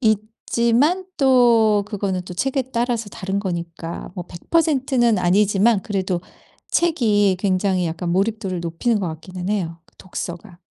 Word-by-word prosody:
있지만 235 - +1
또 235 -6 +4
그거는 195 -3 -2
또 180 - -8
책에 270 +7 0
따라서 235 -2 -1
다른 195 0 -3
거니까 170 -3 -5
뭐 180 - -5
100% 275 - 0
는 235 -4 +4
아니지만 200 +3 +3
그래도 190 -5 -2 0.5
책이 215 - +2
굉장히 185 -2 +1
약간 170 +1 -3
몰입도를 195 -1 -1
높이는 170 +7 0
것 180 - -1
같기는 180 +4 -7
해요 170 -5 -2
그 - - -29
독서가. 175 0 -7
200 Hz, 285 characters per minute, -21 LUFS, 180-235 Hz, 0.5 s, 또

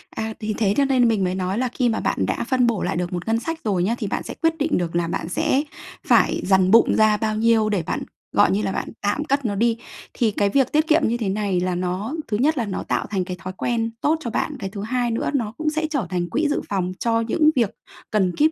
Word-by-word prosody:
À, 220 0 -3
thì 215 -1 -2
thế 205 -3 +2
cho 280 - +4
nên 255 -3 +3
mình 215 -4 +1
mới 180 0 0
nói 190 +1 -2
là 255 +1 +1
khi 245 0 0
mà 220 - 0
bạn - - 0
đã - - -2
phân 255 -2 +3
bổ 225 -5 0
lại - - -1
được 180 0 -2
một 175 +2 -4
ngân 225 +1 +2
sách 325 +7 -4
rồi 195 -5 +1
nhá, 220 +6 +1
thì 215 - -3
bạn - - -2
sẽ - - -6
quyết 325 0 +2
định 300 0 +1
được 170 -1 -2
là 170 -1 +1
bạn 165 0 -3
sẽ 265 +9 +1 0.4
phải - - +4
dằn 190 -1 +3
bụng 230 +2 +6
ra 215 -1 +4
bao 215 0 -1
nhiêu 225 -1 +3
để 200 -5 0
bạn, - - -2 0.3
gọi - - +4
như 100 +2 +1
là, 100 - -1
bạn - - -3
tạm 205 +9 0
cất 280 -2 0
nó 205 -3 0
đi. 230 +2 +2 0.4
Thì 225 -3 +1
cái 200 0 +1
việc 265 +3 +2
tiết 310 +1 +2
kiệm 320 0 +4
như 235 +2 0
thế 215 -5 -2
này 200 -2 0
là 180 0 -1
nó 185 - -2
thứ 210 - -1
nhất 300 +5 +2
là 235 - 0
nó 200 - -4
tạo - - -1
thành 190 -3 -1
cái 180 -1 -5
thói 185 0 -6
quen 230 -2 -1
tốt 315 +2 +2
cho 240 - -4
bạn, - - -2
cái 195 - -4
thứ 200 0 -7
hai 240 +1 -1
nữa 225 - -1
nó 230 -6 -1
cũng 310 0 0
sẽ 315 0 -1
trở 275 - -1
thành 175 -1 -2
quỹ 305 +1 +1
dự 290 - 0
phòng 185 -2 -1
cho 230 -1 +1
những 305 +7 +3
việc 230 -5 +1 0.4
cần 190 -4 +1
kíp, 310 +2 +3
220 Hz, 280 wpm, -22 LUFS, 190-255 Hz, 0.4 s, bụng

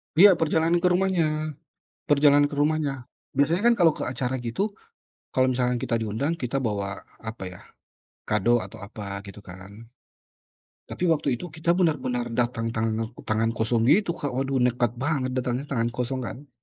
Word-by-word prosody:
Iya 190 0 +8
perjalanan 165 +2 +2
ke 180 - +2
rumahnya. 165 -4 +1 0.6
Perjalanan 145 0 +5
ke 145 - -6
rumahnya. 145 -2 0 0.3
Biasanya, 175 +11 +3
kan, - - +3
kalo 175 -7 +5
ke - - -3
acara 130 0 -2
gitu 120 - -2 0.6
kalo 130 0 +3
misalkan 125 -1 +1
kita 115 0 -1
diundang 115 +10 -1
kita 135 -2 -2
bawa 100 -5 -3 0.2
apa, 110 -2 -6
ya, 90 -1 -10 0.7
kado 120 +4 +3
atau - - -10
apa 100 -1 -6
gitu, 100 +1 -10
kan. 100 +5 -12 1.0
Tapi 180 - -3
waktu 145 -6 +1
itu - - -5
kita 160 +1 -1
benar-benar 130 -9 0
datang 120 -1 0
tanak 110 +1 -1
tangan 110 +1 +1
kosong 115 0 +1
gitu 175 +5 +4
Kak, 145 -4 -4
waduh 135 +1 0
nekat 125 -2 +2
banget 135 -2 0
datangnya 125 +1 -1
tangan 115 -3 +1
kosong, 130 +1 -2
kan. 140 +5 -9
130 Hz, 160 wpm, -25 LUFS, 115-155 Hz, 1.0 s, Iya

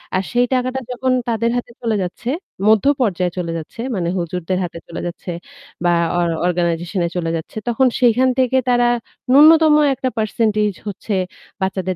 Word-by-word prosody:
আর 190 - +1
সেই 245 0 +3
টাকাটা 255 +1 0
যখন 255 +1 -1 0.2
তাদের 230 0 +1
হাতে 240 - -5
চলে 225 -2 0
যাচ্ছে, 200 +7 -5 0.4
মধ্য 220 +3 +4 0.2
পর্যায় 180 -5 +1
চলে 170 -2 -2
যাচ্ছে, 165 +8 -8
মানে 175 -2 -1
হুজুরদের 180 +1 -2
হাতে 170 -1 -6
চলে 170 - -6
যাচ্ছে 175 +1 -8 0.6
বা - - +4 0.3
or 175 -1 +2 0.2
organization 175 +1 -1
এ - - -5
চলে 165 -1 -1
যাচ্ছে, 160 - -9
তখন 255 +2 +3
সেইখান 250 +2 +4
থেকে 260 0 +2
তারা 245 0 +3 0.4
ন্যূনতম 310 +2 +7 0.2
একটা 260 0 -2
percentage 215 -2 0
হচ্ছে 205 +1 -4 0.5
বাচ্চাদের 190 -1 -1
215 Hz, 160 wpm, -19 LUFS, 180-245 Hz, 0.6 s, ন্যূনতম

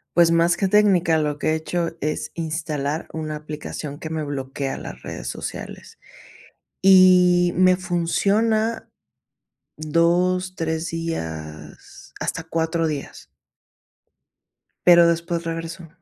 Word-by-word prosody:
Pues, 170 -1 +5
más 170 +1 +3
que 195 - +1
técnica, 185 -5 +3
lo 150 -1 -1
que 150 - -1
he 160 - +1
hecho 165 +1 -3
es 150 +1 -3
instalar 155 -2 -3
una 155 -1 -4
aplicación 150 -1 -7
que 155 - -6
me 160 -1 -3
bloquea 135 -1 -4
las - - -9
redes - - -7
sociales, - - -7 0.8
y 180 -2 +6
me 185 0 +5
funciona 205 +6 0 0.9
2 175 +4 +1
3 160 0 -2
días, 80 - -7
hasta 165 - -3
4 165 0 -1
días. 145 -3 -6 1.6
Pero 170 -1 +8
después 170 0 -1
regreso. 165 +1 -5
165 Hz, 110 wpm, -22 LUFS, 155-180 Hz, 1.6 s, Pero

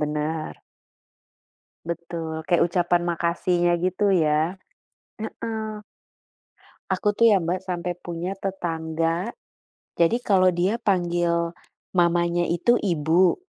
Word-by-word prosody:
bener. 150 +1 -2 1.3
Betul, 165 -1 -5
kayak 175 - +3
ucapan 175 -1 +2
makasihnya 175 +1 +1
gitu 190 +2 +2
ya, 155 +1 +2 0.7
heeh. 225 +1 -5 1.4
Aku 210 0 +1
tuh 230 +2 +5
ya, 200 - +5
Mbak, 180 +2 -2
sampai 180 -1 -3
punya 175 +2 -4
tetangga, 165 -1 -2 0.7
jadi 170 +8 +3
kalau 185 -5 +3
dia 180 +5 +1
panggil 175 -3 +1 0.4
mamanya 175 0 +2
itu 175 +8 +2
ibu, 170 - +2
175 Hz, 100 wpm, -24 LUFS, 165-185 Hz, 1.4 s, tuh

